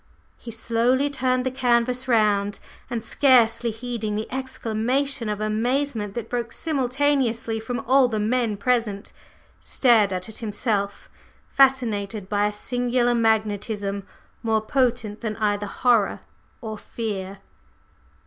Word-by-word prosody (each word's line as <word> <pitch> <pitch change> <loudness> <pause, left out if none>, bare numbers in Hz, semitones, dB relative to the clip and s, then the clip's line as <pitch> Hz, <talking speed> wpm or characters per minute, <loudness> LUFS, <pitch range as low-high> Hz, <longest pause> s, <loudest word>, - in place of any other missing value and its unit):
He 240 - -9
slowly 235 +5 +1
turned 255 -2 0
the 260 - 0
canvas 250 0 +1
round, 205 -4 +2 0.3
and, 235 -2 -3
scarcely 235 -2 +3
heeding 225 -2 -4
the 215 +1 -3
exclamation 260 0 -1
of 210 -1 -2
amazement 220 0 -1
that 235 -2 -4
broke 235 -1 -3
simultaneously 260 -5 0
from 230 +1 -4
all 260 +2 +4
the 220 -3 -2
men 225 0 0
present, 215 -3 -1 0.5
stared 225 -6 +3
at 185 0 -3
it 220 - -7
himself, 210 -2 -2 0.4
fascinated 225 -7 +2
by 205 0 +2
a - - -2
singular 245 +2 0
magnetism 210 -3 0 0.4
more 225 -1 +1
potent 230 -3 0
than 215 -2 -3
either 205 -1 0
horror 235 -1 +2 0.4
or 215 -3 -6
fear. 200 -4 -5
230 Hz, 120 wpm, -24 LUFS, 210-250 Hz, 0.5 s, all